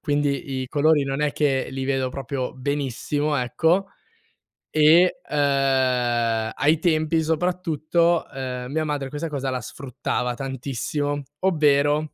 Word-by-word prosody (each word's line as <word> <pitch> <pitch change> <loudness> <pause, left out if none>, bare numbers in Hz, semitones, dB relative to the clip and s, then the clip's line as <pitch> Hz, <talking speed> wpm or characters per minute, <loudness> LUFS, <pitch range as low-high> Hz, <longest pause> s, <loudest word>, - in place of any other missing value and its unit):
quindi 145 -3 -1
i 130 - -7
colori 150 0 +3
non 135 +1 -2
è 145 -2 +1
che 135 -3 0
li 135 0 -4
vedo 135 -1 0
proprio 135 -1 -4
benissimo, 145 +2 -2
ecco. 165 +9 +1 0.9
E, 160 +4 +5
ehm, 130 -5 +1
ai 155 +2 +2
tempi 160 -1 +1
soprattutto, 170 0 +1
ehm, 130 -1 -5
mia 155 +1 -1
madre 145 -3 -3
questa 150 +3 -4
cosa 135 -2 -3
la 130 -1 -2
sfruttava 125 0 -3
tantissimo, 140 +2 -3 0.2
ovvero 150 -3 +2
145 Hz, 125 wpm, -23 LUFS, 130-155 Hz, 0.9 s, E